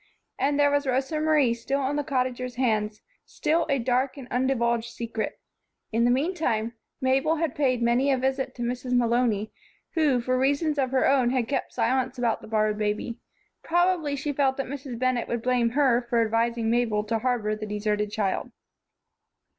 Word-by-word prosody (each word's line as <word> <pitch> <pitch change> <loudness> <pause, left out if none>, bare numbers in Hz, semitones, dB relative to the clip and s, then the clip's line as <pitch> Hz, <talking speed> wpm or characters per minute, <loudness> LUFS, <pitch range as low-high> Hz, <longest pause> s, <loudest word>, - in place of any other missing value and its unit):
And 285 +1 +1
there 285 0 +4
was 285 -1 +1
Rosa 265 +4 0
Marie 305 -6 +3
still 235 +4 -2
on 275 +2 -1
the 295 - 0
Cottagers' 255 -3 -2
hands, 215 -4 0 0.2
still 320 +2 0
a 275 - +2
dark 255 +3 0
and 265 -3 -9
undivulged 235 -2 +1
secret. 230 -2 -4 0.5
In 230 +1 +2
the - - +4
meantime, 250 -5 0 0.3
Mabel 270 +4 +2
had 325 -3 -1
paid 255 -4 +1
many 245 +4 +3
a 265 - +2
visit 265 +1 -1
to 240 - -4
Mrs. 250 +1 -3
Malony, 235 -3 +1 0.4
who 300 -6 +3
for 255 +1 0
reasons 285 +3 +1
of 260 -2 +1
her 260 0 +2
own 265 -3 +3
had 250 -2 0
kept 275 -2 -2
silence 255 +2 0
about 235 -2 0
the - - -11
borrowed 215 -1 +1
baby. 210 +2 -2 0.4
Probably 345 -4 +1
she 290 +1 -3
felt 265 -1 +1
that 275 - -2
Mrs. 265 -2 -6
Bennett 255 -1 0
would 235 -1 -3
blame 245 -2 +2
her 255 -4 +4
for 235 - +2
advising 230 0 +1
Mabel 230 -3 +1
to 225 +1 -1
harbor 225 -3 0
the 215 0 -6
deserted 210 0 -1
child. 210 -3 -1
250 Hz, 180 wpm, -26 LUFS, 230-275 Hz, 0.5 s, there